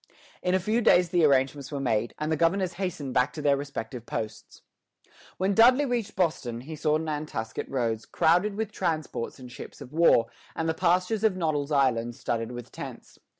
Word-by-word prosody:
In 180 0 +1
a - - +3
few 215 +6 0
days 180 -5 +5
the 175 -2 +2
arrangements 135 -1 +2
were 140 - -3
made, 115 -4 0
and 155 +1 -2
the - - +3
governors 175 +3 +1
hastened 150 -8 -3
back 125 0 +2
to 155 - -6
their 145 -1 +4
respective 130 -4 -6
posts. 110 -1 -6 0.7
When 190 +2 +1
Dudley 250 +7 +6
reached 240 -5 -2
Boston, 135 -10 -1
he 155 +5 -7
saw 150 0 +1
Nantasket 150 -8 -4
Roads 115 -4 -1
crowded 180 +6 +2
with 220 0 -3
transports 160 - -3
and 125 -2 -11
ships - - -10
of 125 - -11
war, 160 -8 +5 0.3
and 160 - -1
the 160 - +1
pastures 185 +5 +1
of 210 -4 +3
Noddle's 155 -4 -1
Island 120 -4 +2
studded 115 0 -3
with 120 -1 -8
tents. - - -9
155 Hz, 185 wpm, -27 LUFS, 125-180 Hz, 0.7 s, Dudley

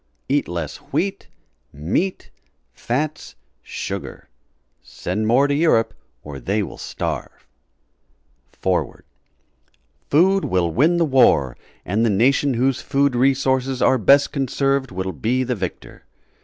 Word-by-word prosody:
Eat - - +1
less 85 -3 -5
WHEAT 195 +1 -3 0.4
MEAT 85 - -2 0.4
FATS 145 - -3 0.3
SUGAR - - -6 0.5
Send 105 +5 -4
more 125 +5 +4
to 145 - 0
Europe 140 -7 +2 0.3
or 70 -2 -8
they 100 - -1
will 80 - -8
Starve] - - -5 1.1
FOREWORD - - -2 1.0
Food 190 +6 +3
will 90 -2 0
win 160 - +3
the 170 - +3
war, 80 - +3 0.3
and 105 +5 0
the 115 - +3
nation 130 +6 +2
whose 130 +2 +1
food 140 -1 +1
resources 130 0 +1
are 130 - +3
best 140 +6 +4
conserved 135 -1 0
will 95 0 -4
be 125 +4 0
the 125 0 -1
victor. 95 -6 -7
130 Hz, 120 wpm, -21 LUFS, 95-140 Hz, 1.1 s, more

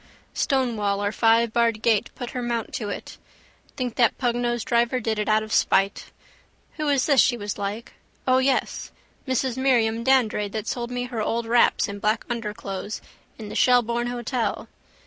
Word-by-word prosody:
Stonewall 220 -7 0
or 205 - 0
fivebarred 230 0 +2
gate 225 -3 +2
put 245 - -6
her 250 - -4
mount 235 -2 -3
to 210 -3 -3
it. - - -7 0.6
Think 250 -4 -3
that 235 -3 +3
pugnosed 240 -1 -1
driver 240 +1 +1
did 220 -1 -2
it 210 - -1
out 215 0 +3
of 215 - -6
spite. 195 +1 +2 0.7
Who 305 -1 -2
is 275 -3 +2
this 280 -4 +5
she 240 - +2
was 205 -1 -5
like? 205 +4 -4 0.3
O 255 0 +4
yes! 260 0 0 0.4
Mrs 260 -1 0
Miriam 230 -4 +2
Dandrade 225 -6 +2
that 220 -2 -3
sold 240 -1 -3
me 245 0 -3
her 245 -3 -4
old 230 +2 -1
wraps 235 +1 +3
and 200 -1 -7
black 215 +2 0
underclothes 210 -3 -4 0.4
in 215 -2 -8
the - - -7
Shelbourne 240 -1 +3
hotel. 240 -2 -2
235 Hz, 165 wpm, -24 LUFS, 215-245 Hz, 0.7 s, this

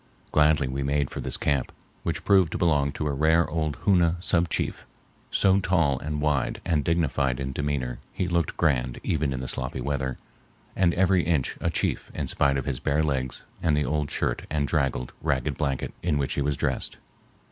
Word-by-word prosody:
Gladly 75 -2 +4
we 65 +2 -3
made 70 0 0
for - - -5
this - - -3
camp, 70 -3 0 0.3
which - - -3
proved 95 -5 +4
to - - -1
belong 75 -5 +2
to 75 - -3
a 75 - 0
rare 80 +4 +3
old 80 -2 -1
Hoona 90 -4 +4
sub 85 -1 +2
chief, - - -2 0.5
so 95 -1 +3
tall 85 -8 +2
and 75 +1 -3
wide 75 -2 0
and 75 -3 +1
dignified 70 -6 +1
in 65 0 -3
demeanor 65 -3 -2
he 90 - -2
looked 85 -2 0
grand 65 -6 +1
even 75 -3 0
in 65 -1 -3
the 65 - -4
sloppy 65 +1 -3
weather, 65 0 -2 0.6
and 90 -3 +3
every 95 0 +4
inch 80 -5 0
a - - +1
chief - - -1
in - - -2
spite 70 -1 +1
of 70 - -3
his 70 -4 -2
bare 75 +2 +1
legs 65 -4 -2 0.2
and 75 -3 +2
the 75 - +1
old 75 -1 -1
shirt - - -2
and 75 -2 0
draggled, 70 -5 -1
ragged 65 -2 0
blanket 70 -3 -2
in 80 -4 +1
which 70 -1 -1
he - - -1
was 70 0 0
dressed. - - -1
75 Hz, 195 wpm, -26 LUFS, 70-85 Hz, 0.6 s, Gladly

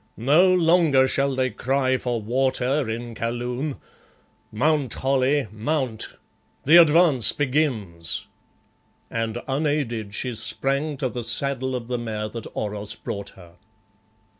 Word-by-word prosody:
No 150 +11 +4
longer 165 -6 +4
shall 140 +1 0
they 130 -1 0
cry 130 +3 0
for 120 -2 -2
water 130 +3 0
in 115 +1 -5
Kaloon! 120 +5 -3 0.8
Mount, 140 +2 +1
Holly, 135 +1 +1
mount! 120 +1 -3 0.5
The 160 +5 +7
advance 165 -6 +6
begins!" 125 - -1 0.9
and 115 +1 -3
unaided 135 -7 -1
she 125 +3 -2
sprang 140 +6 -2
to 130 - -1
the 120 -1 -5
saddle 130 +1 0
of 120 -2 -5
the 125 -1 -2
mare 110 -2 -4
that 115 0 -7
Oros 105 0 -4
brought 100 0 -6
her. 85 -2 -16
130 Hz, 120 wpm, -23 LUFS, 115-145 Hz, 0.9 s, The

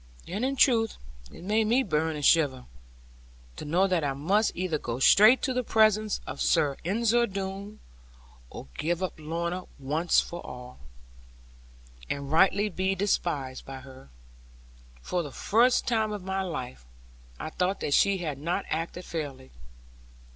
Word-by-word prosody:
And 200 +7 -3
in 270 +1 0
truth, 230 -4 +3 0.3
it - - -12
made 215 +3 +1
me 245 +4 +3
both 205 - -11
burn 160 +1 +1
and 145 -2 -3
shiver, 140 -6 +3 0.9
to - - -8
know 175 +6 +2
that 180 -4 +1
I 140 -1 0
must 190 +11 +1
either 175 -4 -1
go 120 -2 -4
straight 215 - +6
to 260 - 0
the 250 0 -1
presence 215 -2 +2
of 130 - -6
Sir 140 -2 +2
Ensor 230 +6 +2
Doone, 195 +1 -6 0.7
or - - -9
give 170 +3 -1
up 185 - -2
Lorna, 170 +3 -3
once 150 +5 +1
for 175 0 -4
all, 125 0 -10 1.3
and 140 0 -4
rightly 195 +5 +4
be 190 0 -1
despised 160 -9 -1
by 135 -1 -9
her. 130 - -14 0.9
For 180 - -1
the 145 -4 -7
first 240 - +2
time 220 -3 +1
of 205 -3 -5
my 190 +1 -2
life, 130 - -5 0.6
I 155 - -5
thought 185 +4 -1
that 145 - -1
she 200 +4 +4
had 155 -6 -4
not 170 +6 -2
acted 170 +2 -3
fairly. 140 - -6
180 Hz, 155 wpm, -27 LUFS, 150-210 Hz, 1.3 s, straight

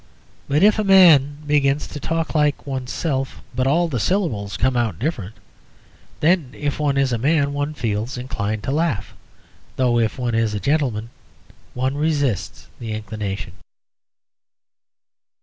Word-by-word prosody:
But 150 +5 +2
if 210 +1 +5
a - - +2
man 165 -8 +6
begins 145 -1 +2
to 145 - -8
talk 165 +1 -2
like 150 -2 +1
oneself, 135 +1 -3
but 130 +1 0
all 170 +5 +3
the 130 -7 -2
syllables 110 - -1
come 130 +2 +1
out 115 -8 0
different, 110 - -3 0.9
then 160 -3 +3
if 145 0 -2
one 145 -2 +1
is 135 -2 +2
a 115 - -1
man 140 +2 +2
one 145 +1 -2
feels 115 0 -2
inclined 110 -4 -3
to 135 - -2
laugh, 140 -8 -1 0.6
though 125 -2 +2
if 110 +1 0
one 125 -2 -2
is 115 -2 +1
a - - -2
gentleman 125 -5 -1 0.6
one 130 +2 0
resists 145 - -1
the 115 -2 -5
inclination. 105 -3 -5
135 Hz, 145 wpm, -21 LUFS, 115-150 Hz, 0.9 s, man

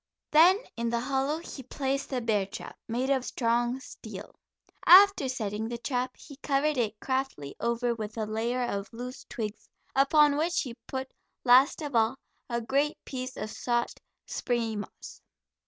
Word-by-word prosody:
Then 340 +5 +7 0.2
in 235 0 -1
the 235 0 0
hollow 270 +4 0
he 325 -4 -8
placed 270 +2 -2
the 255 -2 -1
bear 210 -4 +1
trap, 195 - -8
made 250 +4 -1
of 265 -2 +2
strong 240 +1 0
steel. - - -10 0.5
After 380 -6 +8
setting 220 -3 -3
the 235 +1 -4
trap 250 +1 -2
he 280 -3 -12
covered 295 +1 +1
it 220 -4 -1
craftily 260 - -2
over 235 +1 0
with 220 -1 -6
a 220 - -1
layer 230 +4 -1
of 200 -4 -3
loose 250 +2 -8
twigs, 215 -2 -5 0.3
upon 285 +1 +5
which 340 +3 +1
he 250 -5 -5
put, 265 0 -4 0.3
last 260 +6 +5
of 285 -4 -4
all, 225 +3 +3 0.3
a 235 -1 -1
great 280 +6 +1
piece 255 -1 -5
of 215 - -4
soft, 240 -1 -1 0.2
springy 230 -3 -1
moss. 205 - -9
250 Hz, 160 wpm, -29 LUFS, 230-275 Hz, 0.5 s, After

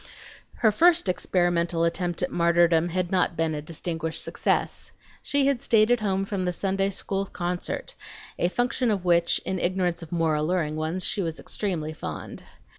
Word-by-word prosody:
Her 220 -2 +3
first 335 - +4
experimental 175 -2 +1
attempt 175 +1 -1
at 180 - -1
martyrdom 170 0 +3
had 180 0 -2
not 180 -3 +1
been 165 -1 0
a 150 - -3
distinguished 160 0 -3
success. - - -1 0.3
She 285 -1 +1
had 275 -3 +1
stayed 220 0 +3
at 245 - +4
home 195 -2 0
from 195 -2 -2
the 180 - -1
Sunday 195 +1 0
school 195 0 -2
concert, 175 0 -4 0.5
a 175 - +3
function 245 +4 0
of 195 -4 -1
which, 170 -1 +3
in 190 -1 -2
ignorance 175 -1 0
of 165 - -10
more 165 -2 +1
alluring 155 0 0
ones, 160 +4 -2
she 200 - 0
was 165 -3 -3
extremely 165 -7 -2
fond. - - -7
175 Hz, 170 wpm, -26 LUFS, 165-195 Hz, 0.5 s, first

